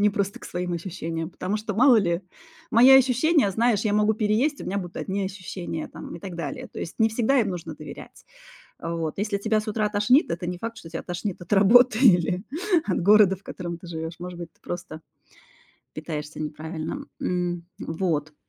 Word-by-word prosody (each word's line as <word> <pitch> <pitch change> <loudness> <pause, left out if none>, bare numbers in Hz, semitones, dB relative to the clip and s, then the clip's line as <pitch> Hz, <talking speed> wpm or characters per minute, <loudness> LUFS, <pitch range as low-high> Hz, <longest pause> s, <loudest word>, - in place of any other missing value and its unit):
не 210 0 +4
просто 200 0 -2
к - - -11
своим 180 0 -3
ощущениям. 165 -1 -4
Потому 190 +5 -3
что, 215 -1 -4
мало 250 +1 +6
ли, 175 -3 +1 0.5
мои 240 +4 +7
ощущения, 265 - +5
знаешь, 225 +1 +2
я 210 - +1
могу 210 +1 +3
переесть, 220 +8 +1
и - - -5
у - - -7
меня 200 - -1
будут 175 -2 -7
одни 195 0 -2
ощущения 185 -4 -5
там, - - -9
и 170 - -12
так 185 -3 -7
далее. 155 -5 -5
То - - -10
есть, 165 - -5
не 225 0 +4
всегда 240 +5 +2
им 210 -4 0
нужно 180 -2 -6
доверять. - - -11 0.5
А 170 - -4
вот. 165 +1 -3
Если 205 0 -1
тебя 215 +1 +1
с 215 - -8
утра 215 0 0
тошнит, 210 - +3
это 175 +1 -3
не 180 0 -4
факт, 230 +2 -5
что 165 - -11
тебя 165 - -5
тошнит 180 +2 -4
от 175 - -10
работы 220 +4 +6
или 180 -6 +4 0.4
от 190 - 0
города, 205 0 +6
в 190 - -23
котором 175 -3 -6
ты 175 - -12
живешь. 160 0 -5
Может 180 -1 -7
быть, 170 -2 -8
ты - - -36
просто 170 -3 -6 0.9
питаешься 155 -1 -6
неправильно. 155 +1 -5 0.2
М, 175 -1 -2
вот. 160 -3 -2
190 Hz, 200 wpm, -25 LUFS, 170-215 Hz, 0.9 s, мои